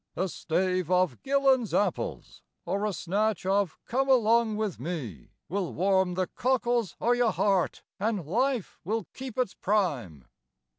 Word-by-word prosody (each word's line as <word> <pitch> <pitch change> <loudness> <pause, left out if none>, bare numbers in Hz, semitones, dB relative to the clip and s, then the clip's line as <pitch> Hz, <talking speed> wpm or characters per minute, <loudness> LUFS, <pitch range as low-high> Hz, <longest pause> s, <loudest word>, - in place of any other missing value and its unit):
A 185 +3 0
stave 185 0 -1
of 185 -1 +2
"Gillan's 270 -4 +2
Apples" 205 - -2 0.2
or 200 +2 -1
a - - -1
snatch 200 +2 -1
of 195 -2 +1
"Come 270 +3 0
Along 230 -3 +4
With 215 - -2
Me" 125 - -5 0.2
Will 190 -1 -2
warm 190 0 +2
the 185 0 +1
cockles 240 -4 0
o' 235 - +2
your 245 -1 +3
heart, 195 -4 +1 0.2
an' 205 -4 -1
life 240 - -1
will 215 +2 -2
keep 260 -4 -7
its 250 -6 0
prime. 140 - -1
200 Hz, 145 wpm, -28 LUFS, 180-235 Hz, 0.2 s, Along